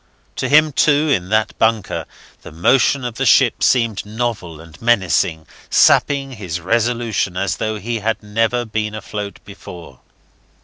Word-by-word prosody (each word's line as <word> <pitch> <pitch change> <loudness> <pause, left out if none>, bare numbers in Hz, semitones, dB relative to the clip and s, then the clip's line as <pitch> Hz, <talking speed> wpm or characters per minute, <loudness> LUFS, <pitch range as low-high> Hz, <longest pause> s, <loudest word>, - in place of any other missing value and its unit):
To - - -2
him, 155 +1 +5
too, 145 +3 +2
in 95 -10 0
that 110 0 0
bunker, 110 -3 0 0.4
the - - -11
motion 125 - +2
of 120 -2 -5
the - - -1
ship - - +4
seemed 115 -5 +1
novel 105 -7 -4
and 80 -1 -15
menacing, 90 -8 +1 0.2
sapping 140 -1 +3
his 95 -8 -5
resolution 115 -1 -1
as 100 +1 -1
though 110 0 -3
he 115 +3 -4
had 110 +1 -2
never 115 +3 -1
been 110 -1 -3
afloat 105 -1 -6
before. 90 -4 -12
110 Hz, 145 wpm, -18 LUFS, 95-120 Hz, 0.4 s, him